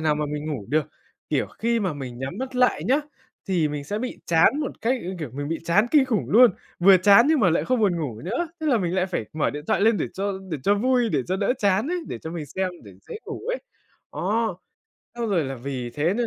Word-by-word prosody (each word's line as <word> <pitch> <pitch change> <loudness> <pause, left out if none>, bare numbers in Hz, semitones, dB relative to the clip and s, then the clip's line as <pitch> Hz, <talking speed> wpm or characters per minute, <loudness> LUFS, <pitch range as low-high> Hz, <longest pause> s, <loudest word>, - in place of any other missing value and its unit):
nào 155 -1 +2
mà 150 0 -1
mình 150 +1 -4
ngủ 110 -8 -5
được. 155 0 +2 0.5
Kiểu - - +1
khi 230 0 -1
mà 185 -5 -1
mình 130 -4 -7
nhắm 135 - -5
mắt 260 0 -5
lại 250 0 +2
nhá, 270 +4 +3 0.5
thì 170 -5 +2
mình 145 -1 -5
sẽ 205 +7 -3
bị 250 +1 -5
chán 170 - +4
một 290 - -2
cách, 245 +2 0 0.2
kiểu, 150 -7 -5
mình 145 +1 -4
bị 165 - -2
chán 200 +7 +3
kinh 295 -3 +5
khủng 235 -5 -1
luôn, 240 +2 +7 0.3
vừa 190 +2 +7
chán 200 +7 +6
nhưng 315 -3 +3
mà 185 - +4
lại 165 - +1
không 255 -2 +1
buồn 190 -5 +2
ngủ 120 -8 -4
nữa, 245 - -2
tức 315 - -4
là 250 -6 +3
mình 180 -1 -1
lại 185 0 +1
phải 175 - -3
mở 155 -1 0
điện 145 +1 -7
thoại - - +1
lên 225 +1 +4
để - - -1
cho 200 +1 -2 0.2
để 155 - -2
cho 205 - +3
vui, 245 +2 +2
để 145 -7 +1
cho 185 - 0
đỡ 200 +5 +1
chán 200 +6 +2
ấy, 360 0 -1
để - - -5
cho 160 - -7
mình 165 -3 -5
xem 190 +5 -2 0.2
để 100 - -12 0.2
dễ - - -6
ngủ - - -7
ấy. - - 0 0.5
Đó, 220 -4 -1 0.6
xong 235 -2 -3
rồi 175 -7 +1
là 135 - -4
vì 125 -1 -5
thế 155 +9 0
nên 240 0 0
190 Hz, 260 wpm, -24 LUFS, 150-235 Hz, 0.6 s, luôn